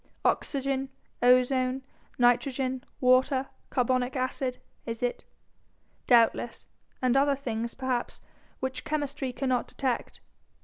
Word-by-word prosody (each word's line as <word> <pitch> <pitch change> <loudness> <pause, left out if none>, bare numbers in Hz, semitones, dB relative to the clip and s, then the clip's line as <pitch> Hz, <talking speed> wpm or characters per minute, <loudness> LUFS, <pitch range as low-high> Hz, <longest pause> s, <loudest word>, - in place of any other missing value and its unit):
Oxygen, 270 -1 0 0.3
ozone, 255 +1 +3 0.3
nitrogen, 255 +1 +2 0.2
water, 260 +1 +3 0.2
carbonic 255 0 +1
acid, 255 0 -1 0.3
is 230 0 -5
it? 245 - -1 0.8
Doubtless 235 -1 +3 0.4
and 255 0 +3
other 280 +1 +4
things, 235 -4 -3
perhaps, 260 -2 -2 0.4
which 260 0 -3
chemistry 290 -3 -2
cannot 255 -1 0
detect. 260 -3 -2
255 Hz, 95 wpm, -28 LUFS, 245-270 Hz, 0.8 s, other